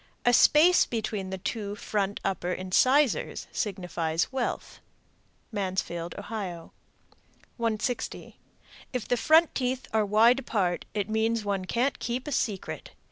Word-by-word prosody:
A 245 - +5
space 320 +8 +6
between 215 -4 -3
the 190 - -4
two 205 +2 -4
front 205 -1 -2
upper 185 -2 -1
incisors 255 +10 +2
signifies 175 -5 -2
wealth. 260 -2 -3 0.7
Mansfield, 185 -4 -3
O. 205 - -6 1.3
160. 230 +1 -3 0.5
If 250 -4 -3
the 245 - +2
front 320 +6 +5
teeth 255 0 -2
are 220 -1 +3
wide 220 +5 +5
apart, 195 -8 -1
it 205 -2 -1
means 220 0 0
one 195 -2 -1
can't 250 +8 0
keep 245 +4 -3
a - - -3
secret. 210 -8 -3
215 Hz, 125 wpm, -27 LUFS, 190-245 Hz, 1.3 s, space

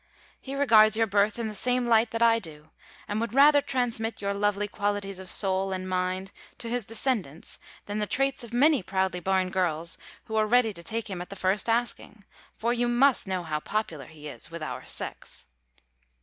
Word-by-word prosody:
He 270 +1 -6
regards 220 -6 +5
your 225 - +4
birth 205 +1 +2
in 230 -2 -2
the 215 - -5
same 250 +4 +1
light 230 -1 +4
that 230 +1 0
I 230 0 +5
do, 155 -5 -9 0.4
and 210 +1 -2
would 230 0 -3
rather 290 +1 +7
transmit 235 -5 -2
your 200 0 -1
lovely 205 0 0
qualities 205 -2 -2
of 190 - -9
soul 190 -1 +1
and 185 0 -3
mind 185 +1 -2 0.3
to 230 - -5
his 245 -3 0
descendants 215 - -1 0.3
than 205 +1 -3
the 210 - -1
traits 270 +1 0
of 235 - -10
many 280 +3 +4
proudly 190 -1 -1
born 185 +1 0
girls 170 -2 0 0.2
who 220 - -6
are 215 0 +3
ready 235 -1 +3
to 170 - -9
take 225 +5 -3
him 190 -4 -5
at 180 - -8
the 200 - -7
first 190 +3 0
asking: 225 -3 -2 0.3
for 235 +2 0
you 240 0 0
must 245 -1 +3
know 185 -2 -2
how 155 -2 -2
popular 165 - -3
he 150 -2 -11
is 150 - -8
with 165 -1 -7
our - - -5
sex. - - -5
210 Hz, 200 wpm, -27 LUFS, 185-235 Hz, 0.4 s, rather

